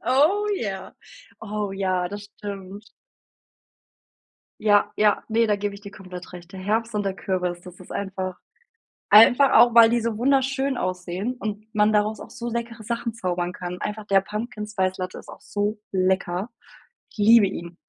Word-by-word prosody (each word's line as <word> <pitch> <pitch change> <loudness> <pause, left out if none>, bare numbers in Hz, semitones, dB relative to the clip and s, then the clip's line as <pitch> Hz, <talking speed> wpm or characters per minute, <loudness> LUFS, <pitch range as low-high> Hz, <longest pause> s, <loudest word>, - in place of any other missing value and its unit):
Oh 305 - +3
ja. 195 - -5 0.5
Oh 210 -2 -3
ja, 185 -2 -1
das 205 +1 -7
stimmt. 200 0 -9 1.7
Ja, 205 -1 +3
ja, 210 -1 +3
ne, 225 +1 +2
da 210 - +2
gebe 205 0 -3
ich 200 - -10
dir 200 -1 -10
komplett 185 -2 -10
recht. 175 0 -11
Der 190 - -8
Herbst 220 +4 -1
und 205 -1 -1
der 195 -1 -1
Kürbis, 180 -2 -2
das 180 0 -13
ist 185 - -11
einfach 190 -2 -4 0.7
einfach 245 +6 +7
auch, 240 -1 +7
weil 230 -1 +8
die 235 +1 +2
so 225 -2 -2
wunderschön 270 0 +1
aussehen 185 +5 -3
und 215 -1 -5
man 210 0 +3
daraus 210 0 +1
auch - - -10
so 235 - -7
leckere 230 -1 -4
Sachen 235 0 -3
zaubern 180 -3 -2
kann 180 0 -6
einfach 210 0 -4
der 195 -2 +4
Pumpkin-Spice-Latte 195 -3 -3
ist - - -12
auch - - -12
so 210 +1 -2
lecker. 185 +2 0 0.6
Ich - - -20
liebe 215 0 +6
ihn. 170 -2 -7
205 Hz, 165 wpm, -24 LUFS, 185-225 Hz, 1.7 s, weil